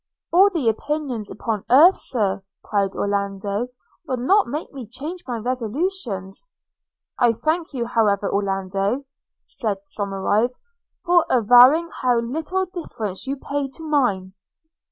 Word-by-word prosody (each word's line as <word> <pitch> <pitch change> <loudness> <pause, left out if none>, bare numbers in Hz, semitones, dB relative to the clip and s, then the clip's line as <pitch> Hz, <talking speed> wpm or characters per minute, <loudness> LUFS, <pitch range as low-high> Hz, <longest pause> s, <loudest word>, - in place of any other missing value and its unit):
'All 385 +3 +7
the 330 -11 -2
opinions 255 -2 -2
upon 215 -2 -3
earth, 310 +10 +7
Sir,' 205 -6 -1 0.2
cried 200 -2 -1
Orlando, 200 +2 -2 0.4
'will 255 - -1
not 380 - +3
make 295 +6 -5
me 260 -5 -8
change 295 - -7
my 240 -2 -2
resolutions.' 245 - -3 0.7
'I 240 -2 +4
thank 315 +7 -1
you, 240 -2 -1
however, 210 -4 +1
Orlando,' 195 +5 -1 0.4
said 215 -5 -3
Somerive, 205 +4 -1 0.5
'for 350 -1 +5
avowing 250 +8 +6
how 250 -1 +3
little 320 +11 -2
deference 265 - -5
you 275 +1 -2
pay 280 +1 -3
to 270 +4 -11
mine.' 245 -12 0
245 Hz, 125 wpm, -22 LUFS, 205-300 Hz, 0.7 s, All